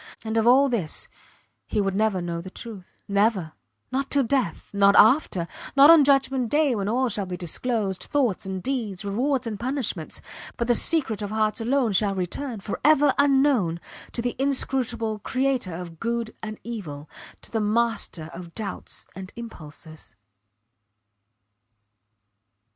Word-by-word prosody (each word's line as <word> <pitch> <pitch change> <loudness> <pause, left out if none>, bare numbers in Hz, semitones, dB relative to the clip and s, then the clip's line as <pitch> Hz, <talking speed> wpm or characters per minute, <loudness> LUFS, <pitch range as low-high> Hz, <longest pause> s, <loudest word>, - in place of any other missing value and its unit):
And 220 0 -3
of 225 0 +2
all 265 +3 +6
this 215 - +1 0.6
he 215 - -1
would 195 -1 0
never 210 -3 +1
know 170 -1 -3
the 185 - -9
truth. 200 -2 -10
Never. 200 -4 +1 0.4
Not 270 +1 -1
till 280 -1 +2
death 245 - -1
not 200 0 +5
after 215 - +4 0.3
not 285 +3 +9
on 325 -3 +8
judgment 270 -3 +2
day 295 -1 +2
when 205 -3 -2
all 255 +3 +1
shall 205 -4 -2
be 180 0 -5
disclosed, 195 +2 -2
thoughts 255 -10 0
and 190 -1 -5
deeds, 220 -8 -3
rewards 250 +6 0
and 215 -3 -4
punishments, 260 0 -2 0.4
but 235 - -1
the 240 - +4
secret 250 -6 +2
of 205 - -3
hearts 215 0 0
alone 245 0 +1
shall 200 +1 +2
return, 215 +7 -3
forever 285 +7 +3
unknown, 270 - +3 0.3
to 235 - -2
the 245 - -2
Inscrutable 250 -5 0
Creator 255 -6 -1
of 170 -2 -8
good 235 -1 -2
and 215 -1 -6
evil, 165 -11 -7 0.4
to - - -10
the 225 - 0
Master 210 -7 -1
of 170 -1 -10
doubts 215 -3 -6
and 185 +1 -8
impulses. 155 - -11
225 Hz, 150 wpm, -25 LUFS, 195-260 Hz, 0.6 s, not